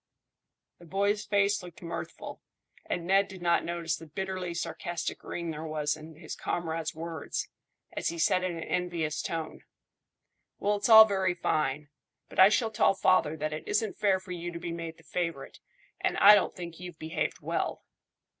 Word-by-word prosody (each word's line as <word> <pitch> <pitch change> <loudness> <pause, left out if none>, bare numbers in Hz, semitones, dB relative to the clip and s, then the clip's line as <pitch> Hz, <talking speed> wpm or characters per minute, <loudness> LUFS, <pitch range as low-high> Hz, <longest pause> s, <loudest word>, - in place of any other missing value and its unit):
The 175 - -14
boy's 200 +4 0
face 200 0 +2
looked 180 -1 -12
mirthful, 170 - -6 0.5
and 170 - -2
Ned 195 +2 +4
did 190 -2 -10
not 170 0 +3
notice 170 -2 -2
the 165 - -11
bitterly 185 +1 -4
sarcastic 170 +1 -4
ring 170 -1 -4
there 155 0 -6
was 155 -2 -1
in 155 +1 -11
his 160 0 -7
comrade's 165 -2 -3
words, 165 -1 -4 0.4
as - - -3
he 170 - -2
said 185 +2 +2
in 180 -2 -2
an 165 - -5
envious 165 -4 -1
tone 165 -1 -4 0.9
"Well, 205 +1 +1
it's 205 - -1
all 220 -1 +11
very 190 -3 0
fine, 150 -3 -1 0.4
but - - -6
I 190 +1 +10
shall 220 +1 +1
tell 210 -2 +3
father 160 -5 +3
that 155 0 -2
it 155 - -6
isn't 210 0 0
fair 195 -2 +3
for 185 0 -11
you 175 0 -4
to 170 - -6
be 170 -1 -5
made 165 -1 -6
the 165 - -19
favourite, 165 -3 -4 0.4
and - - 0
I 205 - +9
don't 205 - +3
think 170 -2 -8
you've 180 -2 -8
behaved 160 0 -3
well." - - -2
170 Hz, 180 wpm, -29 LUFS, 160-190 Hz, 0.9 s, all